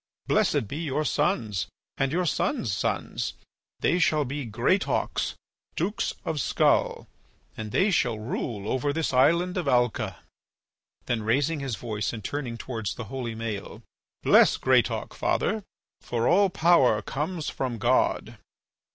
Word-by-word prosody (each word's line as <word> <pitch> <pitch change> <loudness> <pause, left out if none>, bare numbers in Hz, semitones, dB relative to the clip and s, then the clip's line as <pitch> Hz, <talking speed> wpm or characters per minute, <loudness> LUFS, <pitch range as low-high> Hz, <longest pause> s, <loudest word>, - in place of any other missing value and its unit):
Blessed 110 - +2
be 140 - -5
your 155 -2 -1
sons 130 - 0 0.3
and 135 0 0
your 180 +3 +1
sons' 175 - 0
sons! 90 - -2 0.5
They 175 - +2
shall 155 -4 +3
be 140 +1 -4
Greatauks, 120 - 0 0.4
Dukes 195 +6 -1
of 155 -3 -1
Skull, - - +2 0.5
and 110 -1 -6
they 195 - +3
shall 120 -10 +1
rule 105 -1 -4
over 130 +4 0
this 160 -1 -1
island 170 +8 +3
of 175 -5 -2
Alca." 120 -3 +1 0.8
Then 120 -2 -1
raising 140 +8 +1
his 135 -5 -3
voice 105 +1 -3
and 110 -3 -6
turning 125 -1 -4
towards 115 -5 -4
the 120 - -5
holy 120 -4 -3
Maël: 110 -3 -5 0.4
"Bless - - +6
Greatauk, - - +2
father, 220 +1 0 0.4
for 120 0 -1
all 195 +2 +5
power 135 - +4
comes 155 - -3
from 130 -3 -3
God." 120 +4 +1
130 Hz, 135 wpm, -26 LUFS, 115-160 Hz, 0.8 s, Bless